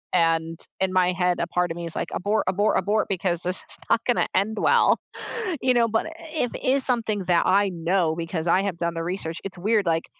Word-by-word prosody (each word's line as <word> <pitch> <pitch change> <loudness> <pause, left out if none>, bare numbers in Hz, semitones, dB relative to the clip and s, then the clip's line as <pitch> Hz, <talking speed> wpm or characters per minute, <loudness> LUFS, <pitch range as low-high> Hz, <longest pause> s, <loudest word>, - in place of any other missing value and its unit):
And 165 -1 +1 0.2
in 190 0 0
my 185 -1 +3
head, 180 0 0
a - - -1
part 180 0 0
of 165 - -5
me 170 - -5
is, 165 - -6
like, - - -3
"Abort, 210 +3 0
abort, 205 +3 +2
abort," 210 +1 0
because 180 -3 -1
this 180 +1 -1
is - - -3
not - - +4
gonna 245 - +2
end 215 +3 +1
well, - - +4 0.6
you 255 -1 +3
know? 235 -1 +3
But, 225 +5 0 0.3
if 250 -7 -1
it - - -8
is 265 +1 +2
something 225 -4 0
that 175 -1 +3
I 200 +2 +3
know 170 -1 0
because 165 0 -3
I 180 +3 +4
have 195 -3 -3
done 170 0 -1
the 165 - -3
research 170 -2 -4
it's 195 -2 -7
weird, 210 +3 +1
like, 165 -1 +1
185 Hz, 230 wpm, -24 LUFS, 170-210 Hz, 0.6 s, not